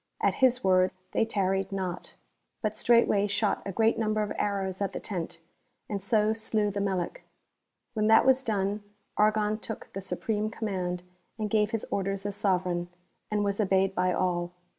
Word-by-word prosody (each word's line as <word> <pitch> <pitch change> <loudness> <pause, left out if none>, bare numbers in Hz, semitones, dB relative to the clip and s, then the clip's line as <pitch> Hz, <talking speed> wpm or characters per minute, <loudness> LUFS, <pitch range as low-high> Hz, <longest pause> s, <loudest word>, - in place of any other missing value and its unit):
At - - +2
his 255 -1 +4
word 185 -1 +4 0.2
they 225 - +2
tarried 195 -2 0
not, 185 -2 -4 0.5
but 215 0 0
straightway 215 -3 +4
shot 205 +1 0
a - - -2
great 225 +3 +2
number 215 -1 +1
of 205 - -3
arrows 195 -2 -2
at 200 - -1
the - - -3
tent, 175 -4 -5 0.5
and 200 -2 -3
so 215 +2 +3
slew 215 -1 0
the 200 0 -2
Melic. 195 - -2 0.7
When 215 -2 +1
that 225 +2 +6
was 265 0 +5
done 205 -3 -1 0.3
Argon 215 0 +2
took 220 - -7
the 195 - -4
supreme 215 +2 -2
command 185 -5 -3 0.3
and 215 -2 -3
gave 210 -1 +3
his 225 -1 -2
orders 195 0 -1
as 205 -1 -2
sovereign, 180 -3 0 0.4
and 210 -1 +1
was 200 0 -1
obeyed 195 -1 +2
by 180 -1 +1
all. 175 -1 0
205 Hz, 170 wpm, -28 LUFS, 190-215 Hz, 0.7 s, that